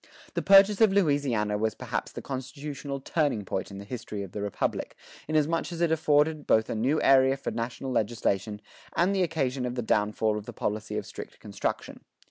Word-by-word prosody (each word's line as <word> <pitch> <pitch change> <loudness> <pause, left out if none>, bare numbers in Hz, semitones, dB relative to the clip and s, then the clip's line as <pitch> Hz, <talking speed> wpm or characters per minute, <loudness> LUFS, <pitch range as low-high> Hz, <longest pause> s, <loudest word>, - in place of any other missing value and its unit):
The - - -1
purchase 195 +2 +6
of 220 -3 +6
Louisiana 140 - +1
was 110 -1 0
perhaps - - -4
the - - -8
constitutional 140 +1 -5
turning 140 - 0
point 95 - -3
in 100 - -9
the 100 - -8
history 110 -3 -5
of 95 - -9
the 105 - -5
Republic, 100 -1 -2 0.3
inasmuch 155 +3 +1
as 170 - -5
it 170 -1 +2
afforded 155 -1 +2
both 110 0 +3
a - - -2
new 130 +8 +1
area 135 0 +5
for - - -4
national 120 +3 -4
legislation 105 -3 -1 0.3
and 180 +4 +3
the 195 - +1
occasion 140 -7 0
of 125 0 -3
the 120 - -2
downfall 105 0 +1
of 105 - -13
the 120 - -7
policy 105 0 -3
of - - -3
strict - - -9
construction. - - -4
130 Hz, 190 wpm, -28 LUFS, 110-155 Hz, 0.3 s, purchase